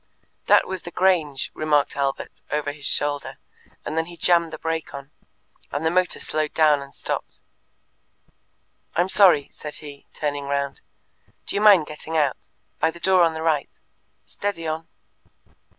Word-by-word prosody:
That - - +6
was 190 -1 -4
the - - -8
Grange, 170 -7 +1
remarked 150 -2 +1
Albert, 140 -1 -3
over 145 -1 -1
his 145 -1 -4
shoulder, 145 -1 -1 0.5
and 155 - -4
then 160 0 0
he 175 -1 -11
jammed 170 -1 +3
the - - -6
brake 165 -2 -3
on, 140 +1 -9 0.6
and 145 +3 -3
the 160 - +3
motor 180 -1 +1
slowed 155 -1 -1
down 150 -3 +4
and 140 0 -10
stopped. - - -5 1.6
"I'm 175 +3 +2
sorry," 185 -8 +5
said 150 -1 -8
he, 145 -2 -10
turning 145 -1 -3
round. 140 0 -2 0.6
"Do - - -3
you 205 - +1
mind 200 -7 +7
getting 155 +2 -5
out 145 -4 0 0.3
by 160 - +3
the 170 - -9
door 185 +1 +4
on 165 -1 +2
the 160 - -4
right? 155 -4 +1 0.6
Steady 200 -5 -4
on!" 160 +1 -3
155 Hz, 160 wpm, -23 LUFS, 145-170 Hz, 1.6 s, mind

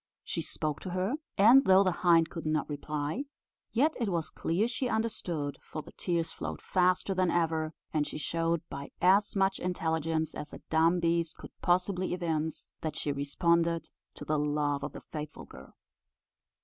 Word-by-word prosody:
She - - -3
spoke 150 -2 -2
to 185 - -6
her, 185 +6 -1 0.2
and 235 +7 +8
though 190 -3 +6
the 185 - +2
hind 170 -2 +4
could 165 - -5
not 155 0 0
reply, 150 - -3 0.5
yet 295 +7 +3
it 230 -4 0
was 165 -4 -2
clear 190 +7 0
she 255 +1 -2
understood, 180 -10 -1
for 155 - -7
the - - -13
tears 170 -2 -1
flowed - - -5
faster 185 +1 +2
than 185 -1 +2
ever, 160 -2 0 0.2
and 150 -2 +1
she - - -5
showed, 165 +2 0
by 140 +1 -7
as 195 +4 +4
much 195 0 +2
intelligence 160 -3 -1
as 150 0 -7
a - - -9
dumb 165 +3 +4
beast 170 -1 +1
could - - -11
possibly 180 0 +1
evince, 160 -3 -2 0.2
that 155 -2 -3
she 145 - -1
responded 165 +4 +1 0.2
to - - -8
the 155 -1 +1
love 145 -1 0
of - - -4
the - - -8
faithful 150 -1 -7
girl. 65 +1 -14
170 Hz, 175 wpm, -30 LUFS, 155-185 Hz, 0.5 s, and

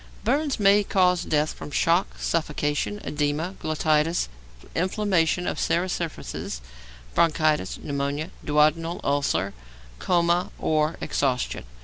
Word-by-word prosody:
Burns 280 +2 +1
may 205 0 +5
cause 180 -3 +3
death 150 -1 +1
from - - -9
shock, 170 +5 +1
suffocation, 150 +4 -1
oedema 150 +4 -1
glottidis, 155 - +1 0.5
inflammation 180 -2 +1
of - - -2
serous 175 +2 +1
surfaces, 160 - -4 0.5
bronchitis, 155 - +2
pneumonia, 140 +2 -3
duodenal 155 +3 +2
ulcer, 140 -9 0 0.5
coma, 175 0 +2
or 155 +1 +1
exhaustion. 125 - -1
160 Hz, 100 wpm, -25 LUFS, 150-180 Hz, 0.5 s, may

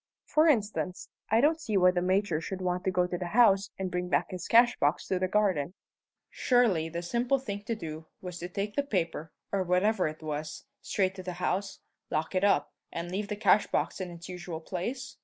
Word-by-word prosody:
"For 310 +2 +3
instance, 210 - 0 0.2
I 225 +2 +4
don't 315 +3 +3
see 220 -9 0
why 180 -1 +6
the 180 -1 0
Major 185 -2 +1
should 190 +3 -5
want 180 -1 -1
to - - +3
go 180 -1 +2
to 180 -1 -3
the 180 - -3
house 200 -5 +5
and 190 -1 -3
bring 180 0 -2
back 155 +1 +1
his 180 -1 -5
cashbox 230 -10 +4
to 185 - +1
the 185 - +1
garden. 185 -5 +1 0.6
Surely 220 -11 +2
the 170 +1 -4
simple 240 +8 +1
thing 205 -6 -5 0.6
was 180 -2 -7
to 175 - -5
take 200 +3 -3
the 285 - +3
paper, 170 - -2 0.2
or 195 - +1
whatever 185 +2 +2
it 155 +1 -7
was, 155 - -5 0.2
straight 190 -3 0
to 190 - -8
the 180 -1 -5
house, 195 +2 -2 0.3
lock 155 +3 -1
it 185 0 +1
up, 150 -8 +2 0.2
and 170 +1 -5
leave 200 +2 -2
the 210 - -3
cashbox 205 -1 +2
in 185 - -4
its 170 0 -10
usual 175 -3 -6
place? 245 +11 -5
185 Hz, 200 wpm, -29 LUFS, 175-210 Hz, 0.6 s, why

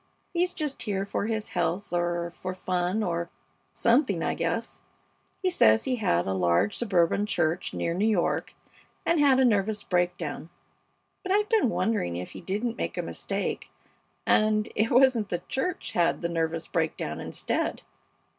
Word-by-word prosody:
He's 355 +1 +1
just 300 -3 -3
here 195 -2 -1
for 200 +1 -2
his 220 -1 -2
health 175 +2 -2
or 175 0 0
for 185 +1 -6
fun 180 +3 -1
or 170 -2 -2 0.5
something, 235 - +2
I - - 0
guess. - - -3 0.6
He 370 - +2
says 110 - +5
he 255 -1 -1
had 90 - +1
a 95 - -1
large 90 - +2
suburban 200 -2 +2
church 165 -2 0
near 170 - -2
New 200 +5 +1
York, 200 -6 0 0.5
and 335 -1 +3
had 275 -3 +5
a 260 - +5
nervous 210 -2 +1
breakdown; 175 -2 -1 0.7
but 375 - -4
I've 420 +1 +2
been 435 - +3
wondering 90 - 0
if 90 - -6
he - - -9
didn't 215 +6 -2
make - - -3
a - - -1
mistake, - - -3 0.6
and 215 0 +3
it 220 +2 +2
wasn't 245 -4 +4
the 175 -1 -3
church 265 -4 -2
had 175 -5 +1
the 170 - 0
nervous 165 -1 -2
breakdown - - -2
instead. - - -2
200 Hz, 160 wpm, -27 LUFS, 170-235 Hz, 0.7 s, says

